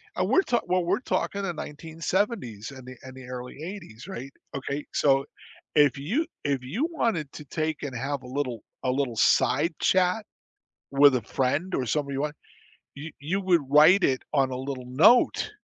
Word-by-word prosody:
and -, -, 0 dB
we're 380 Hz, -, +5 dB
talk 240 Hz, -10 st, 0 dB
well, 180 Hz, 0 st, +2 dB
we're 185 Hz, +4 st, +1 dB
talking 200 Hz, -5 st, -1 dB
the 175 Hz, -3 st, -2 dB
1970s 160 Hz, -, -3 dB
and 130 Hz, -2 st, -11 dB
the 130 Hz, -, -9 dB
and 130 Hz, 0 st, -10 dB
the 130 Hz, -, -10 dB
early 125 Hz, +2 st, -7 dB
'80s, 170 Hz, -, -8 dB
right? 140 Hz, -8 st, -7 dB, 0.2 s
Okay, 140 Hz, +1 st, -3 dB
so 135 Hz, -1 st, +3 dB, 0.5 s
if 145 Hz, -3 st, +5 dB
you 220 Hz, -, 0 dB, 0.2 s
if 140 Hz, -3 st, -1 dB
you 220 Hz, -, -1 dB
wanted 190 Hz, -, -1 dB
to 150 Hz, -, -9 dB
take 155 Hz, +1 st, -3 dB
and 135 Hz, -3 st, -4 dB
have 135 Hz, +2 st, -3 dB
a -, -, -10 dB
little 125 Hz, -4 st, -3 dB, 0.2 s
a 130 Hz, -, 0 dB
little 130 Hz, -3 st, -1 dB
side 150 Hz, +9 st, +3 dB
chat 185 Hz, +3 st, +2 dB, 0.7 s
with 140 Hz, 0 st, +6 dB
a 125 Hz, -, 0 dB
friend, 140 Hz, -, -1 dB
or 130 Hz, -, -1 dB
somebody 140 Hz, +4 st, -1 dB
you 135 Hz, -, -2 dB
want, 150 Hz, 0 st, -2 dB, 0.6 s
you 150 Hz, +3 st, -7 dB
you 170 Hz, +8 st, -2 dB
would 180 Hz, -4 st, +3 dB
write 155 Hz, +7 st, +6 dB
it 130 Hz, -1 st, +2 dB
on 135 Hz, -3 st, +2 dB
a -, -, -3 dB
little 130 Hz, -1 st, -5 dB
note, 210 Hz, -, +4 dB
145 Hz, 185 wpm, -26 LUFS, 130-180 Hz, 0.7 s, with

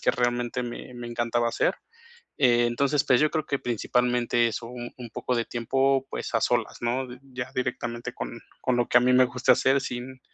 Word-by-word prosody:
que -, -, +3 dB
realmente 120 Hz, 0 st, 0 dB
me 120 Hz, +1 st, -7 dB
me 120 Hz, -1 st, -7 dB
encantaba 120 Hz, 0 st, 0 dB
hacer. -, -, +1 dB, 0.6 s
Entonces, 130 Hz, +3 st, +3 dB
pues, 125 Hz, -4 st, +4 dB
yo 155 Hz, 0 st, +3 dB
creo 155 Hz, -2 st, -2 dB
que 140 Hz, -, -1 dB
principalmente 120 Hz, 0 st, +1 dB
eso, 115 Hz, +1 st, -5 dB
u 125 Hz, -, -9 dB, 0.2 s
un 120 Hz, -2 st, -9 dB
poco 125 Hz, +2 st, -2 dB
de 115 Hz, -, 0 dB
tiempo, 135 Hz, +3 st, +1 dB
pues, -, -, -5 dB
a -, -, +3 dB
solas, -, -, 0 dB
¿no?, 125 Hz, +2 st, 0 dB
d 125 Hz, 0 st, -11 dB
ya 130 Hz, -2 st, -6 dB
directamente 120 Hz, -2 st, -3 dB
con -, -, -6 dB, 0.2 s
con 125 Hz, -, +1 dB
lo 120 Hz, -1 st, +1 dB
que 120 Hz, -, +6 dB
a -, -, +1 dB
mí 125 Hz, 0 st, +4 dB
me 130 Hz, 0 st, +6 dB
gusta 125 Hz, 0 st, +3 dB
hacer, 135 Hz, +1 st, +3 dB
sin 130 Hz, +1 st, -6 dB
125 Hz, 205 wpm, -26 LUFS, 120-130 Hz, 0.6 s, que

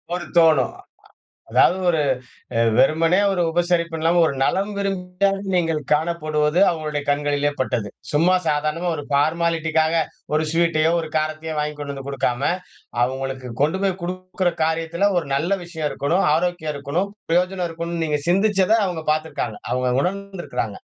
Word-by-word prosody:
ஒரு 175 Hz, -2 st, -5 dB
தோணும். 160 Hz, -6 st, +5 dB
ஆ. -, -, -11 dB, 0.7 s
அதாது 185 Hz, -, +4 dB
ஒரு 160 Hz, -3 st, +3 dB, 0.8 s
வெறுமனே 165 Hz, +7 st, +4 dB
ஒரு 180 Hz, -2 st, +1 dB
உபசரிப்பு 170 Hz, -1 st, 0 dB
இல்லாம 165 Hz, +2 st, +2 dB
ஒரு 140 Hz, -, -1 dB
நலம் 200 Hz, +8 st, +1 dB
விரும்பியா 195 Hz, 0 st, 0 dB, 0.2 s
நீங்கள் 165 Hz, -3 st, +1 dB
காணப்படுவது 155 Hz, 0 st, +1 dB
அவங்களுடைய 155 Hz, -3 st, -3 dB
கண்களிலே 145 Hz, 0 st, +1 dB
பட்டது. 120 Hz, -5 st, -1 dB, 0.2 s
சும்மா 170 Hz, +5 st, +4 dB
சாதாரணமா 155 Hz, +3 st, 0 dB
ஒரு 145 Hz, -, -5 dB
பார்மாலிட்டிக்காக 160 Hz, +1 st, +1 dB, 0.4 s
ஒரு 155 Hz, -, +2 dB
ஸ்வீட்டையோ, 165 Hz, -1 st, +2 dB
ஒரு 160 Hz, -, -5 dB
காரத்தையோ 155 Hz, +1 st, -2 dB
வாங்கி 150 Hz, 0 st, -2 dB
கொண்டு 145 Hz, -1 st, -5 dB
வந்து 135 Hz, 0 st, -8 dB
குடுக்காம, 130 Hz, -2 st, -1 dB, 0.6 s
அவங்களுக்கு 130 Hz, -1 st, -4 dB
கொண்டு 160 Hz, +6 st, +1 dB
போய் 190 Hz, -1 st, 0 dB
குடுக்குற 185 Hz, 0 st, -2 dB
காரியத்துல 165 Hz, +4 st, +1 dB
ஒரு 155 Hz, -, -3 dB
நல்ல 160 Hz, +7 st, 0 dB
விஷயம் 160 Hz, -3 st, -3 dB
இருக்கணும், 170 Hz, +7 st, 0 dB
ஆரோக்கியம் 170 Hz, -3 st, -1 dB
இருக்கணும், 160 Hz, +8 st, -2 dB, 0.2 s
பிரயோஜனம் 180 Hz, +1 st, +1 dB
இருக்கணும்னு 170 Hz, 0 st, -3 dB
நீங்க 150 Hz, -2 st, 0 dB
சிந்திச்சத 195 Hz, +2 st, +3 dB
அவங்க 165 Hz, -3 st, -4 dB
பாத்திருக்காங்க. 145 Hz, -8 st, -3 dB
அவங்க 125 Hz, 0 st, +1 dB
உணர்ந்திருக்கிறாங்க. 180 Hz, -, -3 dB
160 Hz, 140 wpm, -22 LUFS, 150-175 Hz, 0.8 s, தோணும்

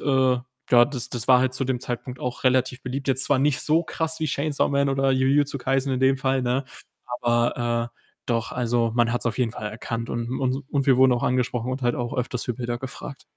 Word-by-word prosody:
äh, -, -, -9 dB, 0.7 s
ja, 120 Hz, -1 st, +7 dB
das 130 Hz, -5 st, -3 dB
das 120 Hz, 0 st, -5 dB
war 125 Hz, -1 st, +7 dB
halt 130 Hz, 0 st, 0 dB
zu 135 Hz, -, -1 dB
dem 130 Hz, -1 st, -1 dB
Zeitpunkt 125 Hz, +1 st, -5 dB
auch 125 Hz, +1 st, -4 dB
relativ 130 Hz, 0 st, +2 dB
beliebt. 135 Hz, +2 st, -4 dB
Jetzt 130 Hz, 0 st, +2 dB
zwar 145 Hz, -2 st, +2 dB
nicht 140 Hz, -1 st, +2 dB
so 160 Hz, +2 st, +2 dB
krass 160 Hz, 0 st, -1 dB
wie 160 Hz, -, -1 dB
Chainsaw 145 Hz, +1 st, 0 dB
Man 140 Hz, 0 st, +1 dB
oder 135 Hz, 0 st, +1 dB
Jujutsu 140 Hz, +2 st, +2 dB
Kaisen 135 Hz, +1 st, 0 dB
in 130 Hz, -, -1 dB
dem 135 Hz, +1 st, +4 dB
Fall, 135 Hz, -1 st, 0 dB
ne, 125 Hz, +3 st, 0 dB, 0.6 s
aber, 120 Hz, 0 st, 0 dB
äh, -, -, -46 dB, 0.3 s
doch, 115 Hz, -2 st, -1 dB
also, 120 Hz, -2 st, 0 dB
man 120 Hz, -1 st, +3 dB
hat‘s 120 Hz, +1 st, -2 dB
auf 120 Hz, +1 st, -1 dB
jeden 120 Hz, -3 st, +1 dB
Fall 105 Hz, -3 st, -5 dB
erkannt 115 Hz, +1 st, -5 dB
und 120 Hz, 0 st, -3 dB
und 130 Hz, +1 st, -1 dB
und 140 Hz, -2 st, 0 dB
wir 130 Hz, -, +5 dB
wurden 130 Hz, 0 st, +6 dB
auch 120 Hz, -, -2 dB
angesprochen 125 Hz, -1 st, 0 dB
und 130 Hz, +1 st, -4 dB
halt 120 Hz, 0 st, +1 dB
auch 120 Hz, -1 st, -3 dB
öfters 125 Hz, 0 st, -2 dB
für 120 Hz, -, -1 dB
Bilder 120 Hz, 0 st, -3 dB
gefragt. 135 Hz, +2 st, -8 dB
125 Hz, 230 wpm, -24 LUFS, 120-135 Hz, 0.7 s, ja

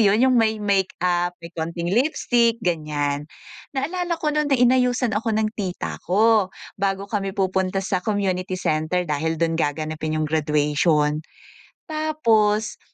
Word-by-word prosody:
yun 210 Hz, +2 st, +4 dB
yung 255 Hz, -1 st, +4 dB
may 220 Hz, -1 st, +2 dB
makeup, 180 Hz, -3 st, 0 dB
may 170 Hz, -, -9 dB
konting 170 Hz, +1 st, -3 dB
lipstick, 240 Hz, -2 st, +2 dB
ganyan. 150 Hz, -4 st, -1 dB, 0.5 s
Naalala 345 Hz, +5 st, -1 dB
ko 305 Hz, -2 st, -1 dB
nun 300 Hz, 0 st, +1 dB
na 280 Hz, -, +3 dB
inayusan 250 Hz, 0 st, +3 dB
ako 225 Hz, -1 st, -1 dB
ng 215 Hz, 0 st, +1 dB
tita 185 Hz, -3 st, -4 dB
ko 215 Hz, +1 st, +4 dB, 0.3 s
bago 195 Hz, 0 st, -1 dB
kami 195 Hz, -2 st, -2 dB
pupunta 190 Hz, 0 st, 0 dB
sa 185 Hz, 0 st, 0 dB
community 190 Hz, -2 st, -1 dB
center 155 Hz, +1 st, 0 dB
dahil 160 Hz, +1 st, -1 dB
dun 165 Hz, 0 st, 0 dB
gaganapin 155 Hz, +1 st, -2 dB
yung 155 Hz, -, 0 dB
graduation. 150 Hz, 0 st, +1 dB, 0.7 s
Tapos 230 Hz, -9 st, +1 dB
190 Hz, 135 wpm, -23 LUFS, 160-225 Hz, 0.7 s, yun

